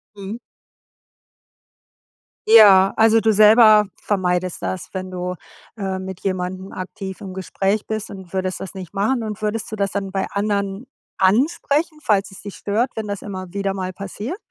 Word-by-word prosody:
Mhm. 200 +3 -7 2.1
Ja, 200 -4 +8
also 225 0 +5
du 220 - +3
selber 215 0 +7 0.2
vermeidest 185 -3 -1
das, 185 - -4
wenn 185 -1 -5
du, 180 0 -4 0.4
äh, 190 -2 -3
mit 190 -1 -7
jemandem 185 0 -3
aktiv 190 +1 -7
im 190 -2 -8
Gespräch 195 +2 -1
bist 220 -1 -4
und 190 -3 -11
würdest 185 -1 -2
das 190 - -7
nicht 185 -3 -9
machen 220 +6 +1
und 215 -1 -5
würdest 215 +1 -2
du - - -3
das 200 -2 -1
dann 195 -1 -3
bei 190 0 -1
anderen 200 +2 -2 0.3
ansprechen, 285 - +1
falls 200 -7 +1
es 195 - -11
dich 200 - -8
stört, 220 +5 -1
wenn 220 -1 -4
das 200 -1 -4
immer 185 -3 -7
wieder 200 -1 -2
mal 185 -1 -4
passiert? 205 - -6
200 Hz, 160 wpm, -21 LUFS, 190-215 Hz, 2.1 s, Ja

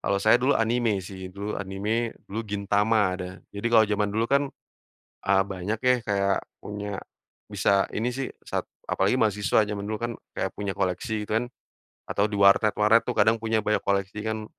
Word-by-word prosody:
Kalau 100 - 0
saya 110 +2 +6
dulu 135 +3 +3
anime 115 -1 +1
sih, 95 0 -8
dulu 100 +1 -4
anime, 105 +4 -2
dulu 105 +3 -4
Gintama, 100 0 +2
ada. 90 -1 -5 0.2
Jadi, 100 +3 -3
kalau 115 -2 +6
zaman 105 -1 0
dulu 110 +3 0
kan, 140 +1 +4 0.8
eee, 95 0 +3
banyak 100 +3 -3
ya 125 +2 +4
kayak 100 -2 +1 0.2
punya 105 -1 -5 0.5
bisa 100 -1 +2
ini 115 +4 0
sih 135 +1 -3 0.2
sat - - -3 0.2
apalagi 95 +5 +2
mahasiswa, 105 0 +3
zaman 100 -1 -4
dulu 110 0 -3
kan 120 0 -1 0.2
kayak - - -1
punya 100 -1 -2
koleksi 105 +4 -1
gitu 110 +1 +1
kan, 120 - -2 0.6
atau 105 +1 0
di 105 - -3
warnet-warnet 105 +3 +5
tuh - - -1
kadang 110 +2 +5
punya 115 0 +1
banyak 105 - +2
koleksi 100 +1 -1
kan, 110 -1 -3
105 Hz, 175 wpm, -26 LUFS, 100-110 Hz, 0.8 s, saya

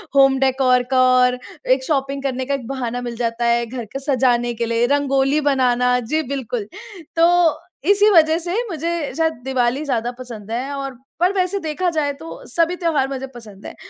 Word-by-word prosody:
Home 270 -1 +5
decor 260 -2 +3
का 255 -1 +4
और, 250 0 +3 0.3
एक 260 +1 +3
शॉपिंग 275 -1 -1
करने 260 -1 -2
का 280 - -2
एक 255 -4 -4
बहाना 245 -2 -3
मिल 240 -1 -5
जाता 235 0 -2
है 235 0 +2
घर 240 0 -6
को 270 - -3
सजाने 245 -4 +1
के 235 +1 -2
लिए, 230 +1 +1
रंगोली 280 +1 +2
बनाना 250 -3 +2
जी 305 +7 -1
बिल्कुल। 240 -5 -4 0.5
तो 335 -1 +4 0.3
इसी 410 +1 +5
वजह 320 -2 +5
से 350 +1 -4 0.2
मुझे 335 -2 -3
शायद 320 -1 +1
दिवाली 260 +1 0
ज़्यादा 245 -3 -1
पसंद 225 -4 -9
है 260 +4 -3
और 275 -2 -5 0.2
पर 360 +3 +3
वैसे 380 +1 0
देखा 320 +2 -1
जाए 305 -3 0
तो 320 +4 -10
सभी 335 +1 +1
त्यौहार 325 -7 0
मुझे 270 0 -5
पसंद 210 -4 -12
है। - - -8
270 Hz, 185 wpm, -20 LUFS, 245-310 Hz, 0.5 s, Home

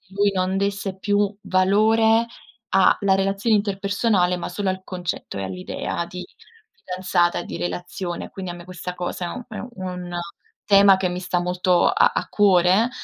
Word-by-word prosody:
lui 200 0 +3
non 185 0 0
desse 200 -1 -2
più 205 0 +1
valore 220 +4 +3 0.4
a 190 -1 +4
la 195 -1 +3
relazione 195 +3 +1
interpersonale, 200 -2 +1
ma 175 - -5
solo 195 +3 -3
al 185 0 -4
concetto 180 - -5
e 100 - -3
all'idea 95 - -4
di 180 +1 -8 0.5
fidanzata 180 -2 0
e 175 - -6
di - - -7
relazione. 175 0 -4
Quindi 185 -2 -6
a - - -8
me 175 0 -11
questa 180 0 -6
cosa 175 0 -4
è - - -3
un 245 +6 -7
è - - -7
u 245 - -7
un 180 -1 -5 0.5
tema 200 -1 +6
che 190 -1 0
mi 180 0 -4
sta 180 0 -1
molto 180 0 +2
a - - +4
a - - -2
cuore, 195 +2 +4
185 Hz, 175 wpm, -22 LUFS, 180-200 Hz, 0.5 s, tema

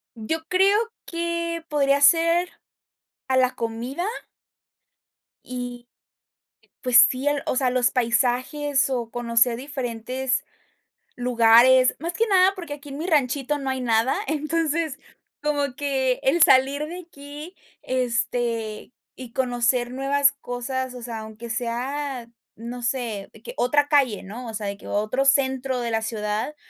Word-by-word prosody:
Yo 320 +9 -3
creo 385 +4 +4 0.3
que 335 -1 -3
podría 280 -1 +2
ser, 335 +3 +4 0.8
a 260 0 +2
la 255 0 +3
comida 240 - -4 1.4
y, 245 -1 -6 0.9
pues 250 -2 +7
sí, 260 +3 -3
al 290 -1 +1
o - - -1
sea, 255 -1 +2
los 245 -1 +2
paisajes 255 +4 +1
o 240 -3 -2
conocer 235 0 +2
diferentes 260 -1 -3 0.7
lugares. 245 +1 +5
Más 335 +3 -4
que 455 - +1
nada, 380 -1 +5
porque 340 -6 -6
aquí 290 0 -10
en 275 - -7
mi 320 - -4
ranchito 290 -2 +1
no 270 - -3
hay 260 0 -2
nada. 230 +1 +2
Entonces, 310 -1 -1 0.4
como 290 -3 -1
que 270 -3 0
el 330 +6 +2
salir 275 +3 +4
de 350 +2 -7
aquí, 295 +4 -10 0.3
este, 235 -3 -2 0.2
y 250 -3 -10
conocer 245 -1 0
nuevas 275 +2 +2
cosas, 250 +1 -4
o 245 - -8
sea, 230 -2 -5
aunque 220 +2 -9
sea, 245 +2 -3 0.3
no 240 +2 -7
sé, 235 -5 -3
que 485 - -8
otra 290 +4 +2
calle, 275 -8 +2
¿no?, 235 +6 -8
o 225 - -6
sea, 210 -2 -4
de 200 0 -4
que - - -13
otro 215 +6 0
centro 265 -2 +2
de 235 -1 -3
la 225 0 0
ciudad, 215 +5 -3
260 Hz, 140 wpm, -24 LUFS, 240-290 Hz, 1.4 s, pues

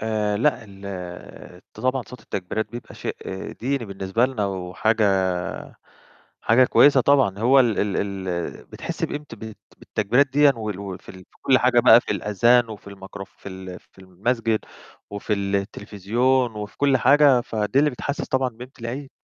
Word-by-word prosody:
آآ 105 -2 -1
لأ، 125 +1 +1
ال 95 -3 -9
ط - - -11
طبعًا 130 0 0
صوت 125 - -11
التكبيرات 105 +3 -4
بيبقى 120 0 -9
شيء - - -5 0.4
ديني 130 0 -2
بالنسبة 100 +4 0
لنا 120 -6 -2
وحاجة 100 +4 0 1.4
حاجة 120 +3 +4
كويسة 140 +1 +5
طبعًا 130 -8 +3
هو 130 +5 +5
ال 120 -4 +2
ال 100 -1 0 0.3
ال 85 -2 -4
بتحس - - -7
بقيمت 150 0 -4
بالت 110 -1 -9 0.2
بالتكبيرات 120 +7 +1
دِيّن 145 +2 +4
وال 105 -4 -5
وفي 95 -2 -8
ال - - -10 0.2
في - - -27
كل 130 -2 +4
حاجة 125 -1 +4
بقى 120 0 +7
في - - -4
الأذان 120 +3 +3
وفي 105 -2 -10
المكروف 95 0 -10
في - - -10
ال 95 -1 -9
في - - -25
المسجد 110 +4 -1 0.5
وفي 100 +1 -3
التلفزيون 105 +5 0
وفي 105 -1 -7
كل 140 -2 +3
حاجة، 135 -1 +5
فدي 110 +3 0
اللي 150 - +3
بتحسس 140 +2 -4
طبعًا 130 -1 0
بقيمت 125 +3 -13
العيد. 130 +4 -5
110 Hz, 160 wpm, -23 LUFS, 100-130 Hz, 1.4 s, بقى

